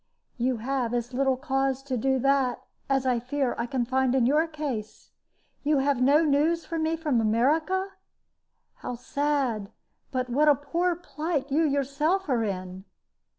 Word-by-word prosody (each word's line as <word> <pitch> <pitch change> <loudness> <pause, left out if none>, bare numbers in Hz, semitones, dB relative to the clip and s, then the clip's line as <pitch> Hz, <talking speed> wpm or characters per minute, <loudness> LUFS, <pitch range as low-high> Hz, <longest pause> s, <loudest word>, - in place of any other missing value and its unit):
"You 250 +1 +1
have 245 0 -1
as 240 +1 -3
little 265 0 +1
cause 270 -1 -1
to 270 -2 -3
do 265 +3 +1
that 275 -2 +1 0.3
as 270 -1 +1
I 250 -2 +2
fear 255 +1 -1
I 235 - -1
can 245 -1 -1
find 260 +1 +1
in 255 -3 +3
your 300 +6 +3
case. 285 -9 -6 0.5
You 295 0 +2
have 270 -1 +1
no 285 +5 +5
news 310 +4 +2
for 330 - -3
me 320 +1 0
from 295 -8 +1
America? 310 - +1 0.9
How 245 - -5
sad! 260 -5 -1 0.4
But 255 -1 -1
what 285 +5 +2
a 295 - +7
poor 340 +6 -1
plight 310 -4 -3
you 300 +4 +3
yourself 295 +6 0
are 240 -4 +2
in!" 185 -2 -5
270 Hz, 160 wpm, -27 LUFS, 245-300 Hz, 0.9 s, a